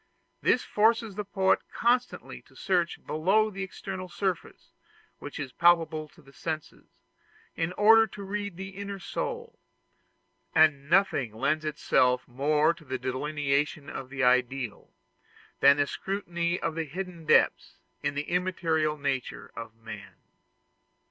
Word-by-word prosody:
This 250 Hz, -, +3 dB
forces 225 Hz, 0 st, +2 dB
the 210 Hz, +2 st, -4 dB
poet 190 Hz, -1 st, +2 dB
constantly 245 Hz, +1 st, 0 dB
to -, -, -22 dB
search 175 Hz, -3 st, -1 dB
below 195 Hz, +8 st, +2 dB
the 195 Hz, 0 st, -6 dB
external 190 Hz, -1 st, -6 dB
surface 185 Hz, -1 st, -4 dB, 0.5 s
which 145 Hz, -, -8 dB
is 140 Hz, -3 st, -4 dB
palpable 165 Hz, -2 st, +3 dB
to 165 Hz, +1 st, -21 dB
the 135 Hz, 0 st, -18 dB
senses, 155 Hz, 0 st, -6 dB, 0.7 s
in 165 Hz, +1 st, -1 dB
order 225 Hz, +3 st, +6 dB
to 205 Hz, -1 st, -9 dB
read 205 Hz, -2 st, -4 dB
the 190 Hz, 0 st, -6 dB
inner 200 Hz, +1 st, -6 dB
soul: 465 Hz, -, -5 dB, 1.0 s
and 150 Hz, -3 st, +4 dB
nothing 160 Hz, -, +2 dB
lends 150 Hz, +6 st, 0 dB
itself 125 Hz, -4 st, +2 dB
more 150 Hz, +5 st, +2 dB
to 170 Hz, -, -17 dB
the 130 Hz, -3 st, -4 dB
delineation 145 Hz, +2 st, -1 dB
of 130 Hz, -, -7 dB
the 135 Hz, -1 st, -2 dB
ideal 125 Hz, -2 st, +1 dB, 0.7 s
than 140 Hz, +1 st, +7 dB
the 145 Hz, -, +3 dB
scrutiny 175 Hz, 0 st, -2 dB
of -, -, -2 dB
the 165 Hz, 0 st, -2 dB
hidden 170 Hz, +1 st, -7 dB
depths -, -, +3 dB, 0.3 s
in 145 Hz, 0 st, -2 dB
the 145 Hz, -, -1 dB
immaterial 165 Hz, -4 st, 0 dB
nature 140 Hz, -3 st, -3 dB
of 115 Hz, -1 st, -8 dB
man. 115 Hz, 0 st, -10 dB
165 Hz, 135 wpm, -28 LUFS, 140-195 Hz, 1.0 s, than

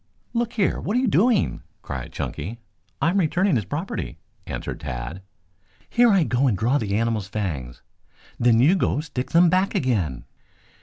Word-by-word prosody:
"Look 235 Hz, 0 st, -1 dB
here, 200 Hz, -5 st, +1 dB
what 210 Hz, +5 st, -1 dB
are -, -, +4 dB
you 260 Hz, -, +1 dB
doing?" 220 Hz, +2 st, +2 dB, 0.2 s
cried -, -, -6 dB
Chunky. 100 Hz, +11 st, -5 dB, 0.4 s
"I 165 Hz, -, +2 dB
am 200 Hz, -, +2 dB
returning 180 Hz, +1 st, +2 dB
his 110 Hz, -5 st, 0 dB
property," 145 Hz, -, -4 dB, 0.3 s
answered -, -, -5 dB
Tad. 60 Hz, +9 st, -5 dB, 0.7 s
"Here 240 Hz, 0 st, +5 dB
I 195 Hz, -5 st, +4 dB
go 135 Hz, -1 st, +1 dB
and 105 Hz, -7 st, +1 dB
draw 120 Hz, +7 st, +2 dB
the 100 Hz, -3 st, -1 dB
animal's 115 Hz, -3 st, 0 dB
fangs, 85 Hz, -, -4 dB, 0.6 s
then 120 Hz, -1 st, +4 dB
you 145 Hz, +9 st, +5 dB
go 175 Hz, -, +1 dB
stick 135 Hz, -5 st, -5 dB
them 170 Hz, +1 st, +5 dB
back 185 Hz, +3 st, +2 dB
again! 95 Hz, -, 0 dB
130 Hz, 165 wpm, -24 LUFS, -, 0.7 s, Here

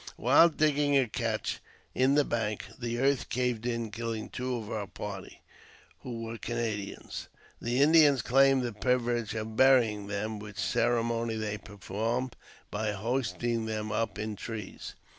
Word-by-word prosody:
While 145 Hz, +8 st, +6 dB
digging 150 Hz, -2 st, +2 dB
a 130 Hz, -2 st, +3 dB
cache 110 Hz, -1 st, -2 dB, 0.3 s
in 130 Hz, +2 st, +3 dB
the 145 Hz, -1 st, +4 dB
bank, 110 Hz, -3 st, -2 dB
the 120 Hz, -1 st, -2 dB
earth 135 Hz, +1 st, +1 dB
caved 120 Hz, -1 st, -1 dB
in, 115 Hz, -2 st, -2 dB
killing 115 Hz, 0 st, -4 dB
two 125 Hz, 0 st, -3 dB
of 110 Hz, -3 st, -6 dB
our 105 Hz, -2 st, -3 dB
party, 100 Hz, -1 st, -8 dB, 0.6 s
who 115 Hz, -2 st, -6 dB
were 115 Hz, 0 st, -6 dB
Canadians. 110 Hz, -4 st, -4 dB, 0.3 s
The 120 Hz, +4 st, +2 dB
Indians 150 Hz, -5 st, +6 dB
claimed 135 Hz, +1 st, +4 dB
the 120 Hz, -2 st, -3 dB
privilege 120 Hz, -1 st, 0 dB
of 110 Hz, 0 st, -4 dB
burying 115 Hz, -6 st, +4 dB
them, 105 Hz, +1 st, -3 dB
w^hich 105 Hz, 0 st, -9 dB
ceremony 115 Hz, +3 st, +1 dB
they 105 Hz, -1 st, -3 dB
performed 115 Hz, +6 st, -3 dB, 0.4 s
by 105 Hz, 0 st, -1 dB
hoisting 115 Hz, +1 st, -1 dB
them 110 Hz, -1 st, -3 dB
up 110 Hz, -1 st, -1 dB
in 105 Hz, 0 st, -3 dB
trees. 110 Hz, -1 st, -7 dB
115 Hz, 145 wpm, -30 LUFS, 110-125 Hz, 0.6 s, While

